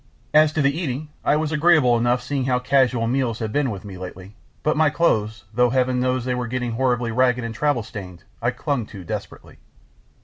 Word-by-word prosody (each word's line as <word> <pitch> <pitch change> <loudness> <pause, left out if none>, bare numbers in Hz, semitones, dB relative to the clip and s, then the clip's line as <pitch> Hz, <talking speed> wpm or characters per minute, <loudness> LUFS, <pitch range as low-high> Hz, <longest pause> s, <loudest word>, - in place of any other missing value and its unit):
As 155 0 +6
to 155 - +1
the 140 +1 +2
eating, 155 -3 -3
I - - +3
was 155 0 -1
agreeable 155 -5 +4
enough 120 +1 +1
seeing 135 0 -2
how 130 -1 +2
casual 125 -2 +2
meals 120 -1 0
had 110 -2 -4
been 145 -2 +1
with 100 -2 -6
me 95 -3 -8
lately, 95 +2 -9 0.3
but 155 - +2
my 155 -1 +4
clothes, 110 -10 0
though 125 +2 +3
Heaven 130 0 +1
knows 125 -1 0
they 130 - 0
were 125 -1 -2
getting 125 0 -2
horribly 120 -1 0
ragged 125 +1 +2
and 115 -1 -4
travel 145 -1 0
stained, 95 -6 -9 0.2
I 120 - +2
clung 125 -3 -2
to 100 -4 -10
desperately. - - -7
125 Hz, 205 wpm, -22 LUFS, 115-140 Hz, 0.3 s, As